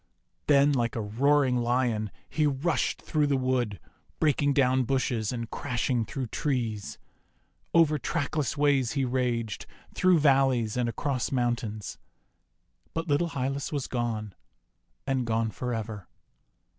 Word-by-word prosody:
Then, 145 0 +5
like 120 -4 0
a 115 - -1
roaring 130 +5 +2
Lion, 120 -3 0 0.2
he 155 -2 +1
rushed 145 +2 0
through 150 -2 +1
the 140 -1 +2
wood, 125 -6 0 0.4
breaking 145 -2 +2
down 130 -1 +3
bushes 125 -4 0
and 115 -2 -4
crashing 125 -3 -1
through 135 +1 -4
trees. 115 -5 -2 0.7
Over 155 -3 +4
trackless 150 -1 -1
ways 140 -4 +2
he 135 -2 +1
raged, 120 -4 -1 0.3
through 185 -1 +4
valleys 135 -6 +3
and 125 -1 0
across 130 +1 -2
mountains; 120 -5 -2 1.0
but 165 +1 -2
little 155 +3 +1
Hylas 135 0 -2
was 145 -3 -2
gone, 115 -4 -3 0.7
and 130 -1 0
gone 115 -1 0
for 125 +4 -4
ever. 110 -4 -5
130 Hz, 130 wpm, -28 LUFS, 115-145 Hz, 1.0 s, Then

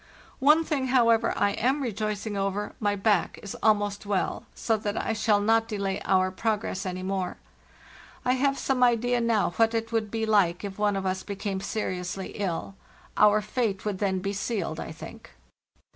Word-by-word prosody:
"One 300 +4 +5
thing, 280 -5 -1
however, 230 -3 +4
I 205 - +3
am 265 +7 0
rejoicing 215 -2 -3
over; 195 +1 -2
my 205 -1 +1
back 200 -2 +1
is 200 - -6
almost 205 -1 +2
well, 200 -2 -1
so 225 - +1
that 210 0 -3
I - - -1
shall 210 -1 +2
not 225 +2 +3
delay 200 -3 -2
our 185 -1 +3
progress 205 -1 -2
any 185 0 -4
more. 190 -1 -2 0.9
I 250 - +3
have 275 +1 +1
some 265 -2 0
idea 245 0 +3
now 230 -5 +2
what 225 0 +3
it 225 0 -2
would 225 -2 0
be 225 +1 -1
like 200 -5 +2
if 200 0 -6
one 205 -1 +2
of 195 0 -2
us 190 0 -1
became 200 -1 -4
seriously 185 -2 -3
ill. 195 -1 -3 0.4
Our 210 0 +5
fate 210 -3 -2
would 205 -3 -2
then 190 -2 0
be 200 +1 -2
sealed, 195 -6 -2
I - - -5
think. 160 - -11
210 Hz, 175 wpm, -27 LUFS, 195-225 Hz, 0.9 s, One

